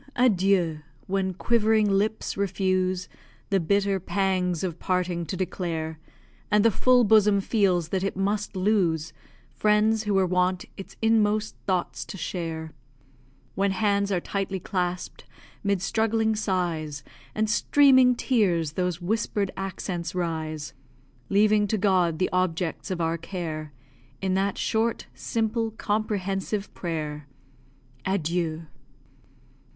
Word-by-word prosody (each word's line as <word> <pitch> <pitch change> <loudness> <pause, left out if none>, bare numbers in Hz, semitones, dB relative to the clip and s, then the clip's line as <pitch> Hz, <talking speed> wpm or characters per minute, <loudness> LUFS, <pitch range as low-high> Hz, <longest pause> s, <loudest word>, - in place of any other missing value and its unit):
adieu! 190 -9 +3 0.3
when 190 0 0
quivering 220 +2 +2
lips 205 +2 0
refuse 185 -2 0 0.4
The 195 - +4
bitter 200 +2 +1
pangs 185 -2 0
of 175 -3 -3
parting 180 -2 -1
to 185 - -4
declare; 165 -4 -3 0.5
And 210 +1 +3
the 230 - +6
full 250 +4 +4
bosom 210 -2 +5
feels 190 -5 +1
that 190 0 -1
it 195 - -2
must 205 +1 -1
lose 185 -5 +1 0.4
Friends 215 +1 +2
who 205 -1 +1
were 190 -1 +4
wont 180 0 +1
its 195 - -10
inmost 215 -1 +2
thoughts 185 -2 -1
to - - -8
share; 165 -3 -4 0.8
When 200 +1 +1
hands 200 +1 +1
are 185 - +2
tightly 195 +1 -3
clasp'd, 180 -1 -3 0.4
'mid 200 -2 0
struggling 220 +1 +1
sighs 170 -8 -2 0.3
And 215 0 +1
streaming 260 +2 +5
tears, 185 - +1
those 180 +1 -2
whisper'd 205 0 -1
accents 185 -2 -4
rise, 155 -4 -3 0.6
Leaving 210 +1 +4
to 215 - 0
God 185 -5 +2
the 185 - 0
objects 180 -2 -1
of 180 -2 -2
our 165 0 0
care 160 -3 -5 0.5
In 190 -1 -1
that 195 +1 0
short, 225 +1 0
simple, 225 0 -1
comprehensive 205 -2 -2
prayer 150 -4 -4 0.8
_Adieu! 170 -3 -1
190 Hz, 120 wpm, -26 LUFS, 175-210 Hz, 0.8 s, the